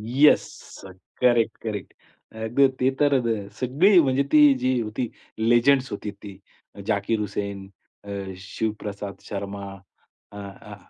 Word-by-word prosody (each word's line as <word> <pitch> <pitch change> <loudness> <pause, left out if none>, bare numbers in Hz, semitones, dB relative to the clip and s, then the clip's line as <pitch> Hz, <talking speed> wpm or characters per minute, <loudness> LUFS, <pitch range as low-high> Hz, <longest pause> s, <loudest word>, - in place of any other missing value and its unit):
Yes. 150 +2 +6 0.8
Correct, 120 -2 +3
correct. 105 -3 -5 0.4
अ, 110 0 -6 0.3
ते 130 +1 +3
तर 145 -2 +4 0.4
सगळी 165 +10 +4
म्हणजे 135 -2 +2
ती 150 -2 +7
जी 130 -1 +1 0.2
ती 125 - 0 0.3
लिजेंड्स 120 +3 +3
होती 100 0 -5
ती 100 -1 -12 0.5
जाकीर 105 +1 0
हुसेन, 100 -1 -4 0.4
अ, 100 - -12 0.3
शिवप्रसाद 100 0 -5
शर्मा. 100 0 -5 0.7
अ, 105 - -11
अ, 100 +1 -10
110 Hz, 115 wpm, -24 LUFS, 100-130 Hz, 0.8 s, ती